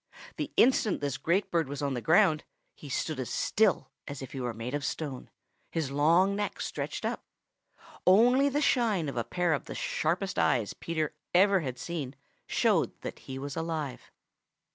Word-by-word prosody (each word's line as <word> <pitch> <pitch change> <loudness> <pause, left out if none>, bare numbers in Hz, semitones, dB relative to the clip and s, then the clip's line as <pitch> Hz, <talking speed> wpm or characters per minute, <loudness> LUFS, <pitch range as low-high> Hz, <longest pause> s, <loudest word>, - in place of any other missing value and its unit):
The - - -3
instant 235 -5 +4
this 140 -2 -2
great 185 +5 +1
bird 165 -3 +1
was 145 +1 -4
on 140 -1 0
the 120 - -3
ground, 160 - +4 0.3
he 145 - -11
stood 150 +2 -2
as 130 - -3
still 200 -10 +1 0.2
as 140 -1 -6
if 130 - -9
he 135 - -5
were 120 -1 -1
made 115 +3 -6
of 145 0 -2
stone, 135 -2 -4 0.4
his 155 -5 -2
long 165 +7 +4
neck 205 0 -3
stretched - - -4
up. - - -2 0.8
Only 245 +9 +6
the 290 +2 0
shine 220 - +2
of - - -6
a 120 - 0
pair 175 +5 0
of 145 - -2
the - - -7
sharpest 180 +4 -1
eyes 110 -5 +2
Peter 160 -3 -3 0.2
ever 195 +1 +6
had 130 -6 -4
seen 145 -1 -5 0.3
showed - - +1
that - - -6
he 130 - -4
was 140 +1 -5
alive. 160 -5 -4
160 Hz, 180 wpm, -29 LUFS, 135-190 Hz, 0.8 s, Only